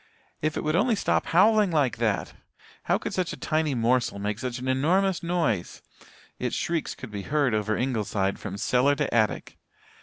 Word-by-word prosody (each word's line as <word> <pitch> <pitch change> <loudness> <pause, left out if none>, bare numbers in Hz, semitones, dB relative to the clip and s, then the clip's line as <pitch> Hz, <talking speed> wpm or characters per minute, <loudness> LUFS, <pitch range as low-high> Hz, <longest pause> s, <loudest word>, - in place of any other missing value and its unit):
If 155 +1 -1
it - - -2
would 155 +1 0
only 225 +5 +3
stop - - 0
howling 210 +3 +4
like 145 -8 +1
that! 110 -5 -1 0.5
How - - +2
could - - -5
such 185 -2 -1
a - - -8
tiny 155 -3 0
morsel 120 -2 +1
make 105 +2 -3
such 125 -2 -3
an 130 +1 -6
enormous 175 +9 +2
noise. 165 - -1 0.6
Its - - -2
shrieks 165 -2 -2
could 130 - -9
be 100 -1 -5
heard 140 +4 0
over 110 0 0
Ingleside 105 -6 -1
from 100 -1 -6
cellar 130 +7 +2
to 145 -1 -2
attic. 110 -2 0
130 Hz, 180 wpm, -26 LUFS, 110-165 Hz, 0.6 s, howling